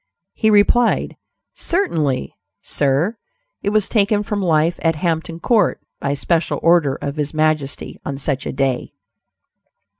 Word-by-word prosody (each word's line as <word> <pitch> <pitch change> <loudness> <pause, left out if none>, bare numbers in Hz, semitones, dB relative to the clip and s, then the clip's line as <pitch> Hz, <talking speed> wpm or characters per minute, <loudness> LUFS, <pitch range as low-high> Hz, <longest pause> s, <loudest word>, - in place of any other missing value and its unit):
'" - - -59
He 220 - +1
replied, 215 +3 +3 0.4
"Certainly; 160 - 0 0.3
sir; 150 - +1 0.4
it 200 - 0
was 210 -1 +1
taken 210 -1 +2
from 205 0 -2
life 165 -1 +2
at 165 -1 +2
Hampton 165 0 -2
Court, 220 +4 +2 0.2
by 140 0 -1
special 165 +3 0
order 165 -5 +4
of 140 +1 -5
his 150 +1 -2
majesty; 155 -3 -1
on 140 - -4
such 135 -1 -2
a - - -2
day." 135 -2 -1
165 Hz, 140 wpm, -19 LUFS, 145-205 Hz, 0.4 s, order